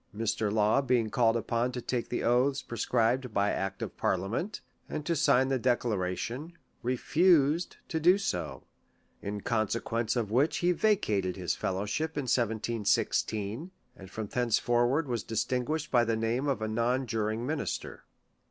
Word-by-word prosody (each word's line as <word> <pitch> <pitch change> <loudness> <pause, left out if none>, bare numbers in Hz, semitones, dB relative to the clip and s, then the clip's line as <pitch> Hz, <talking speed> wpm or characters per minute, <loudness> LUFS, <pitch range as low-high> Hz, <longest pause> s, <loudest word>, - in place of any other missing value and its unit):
Mr. 110 -1 0
Law 110 +5 +3
being 120 -5 +1
called 115 -2 +3
upon 115 +2 -1
to 125 - -4
take 120 0 -3
the 120 - -2
oaths 130 +4 +2
pre 120 - -7
scribed 125 +2 +1
by 100 +1 +2
act 95 0 -3
of - - -6
parliament, 105 - -1 0.3
and 150 -1 -4
to 170 - +1
sign 140 -4 +3
the 135 -1 +1
Declara 110 -7 0
tion, 145 +9 -5 0.3
refused 155 +5 +2
to 160 - -2
do 180 +4 +5
so; 85 - -3 0.6
in 100 0 -4
consequence 115 +1 -1
of 115 -4 -1
which 135 +7 +2
he 175 +1 +2
vacated 110 - +1
his 90 -4 -1
fellowship 105 +13 -2
in 145 - 0
1716, 115 - 0 0.3
and 95 -1 -12
from 110 +2 -5
thencefor 120 +1 +2
ward 145 +4 0
was 120 -3 -1
distinguished 130 +7 -2
by 120 -2 +5
the 115 -1 0
name 115 +5 0
of 135 -6 0
a - - -1
non 120 +4 0
juring 110 0 -2
minister. 150 +2 -4
120 Hz, 160 wpm, -29 LUFS, 110-135 Hz, 0.6 s, do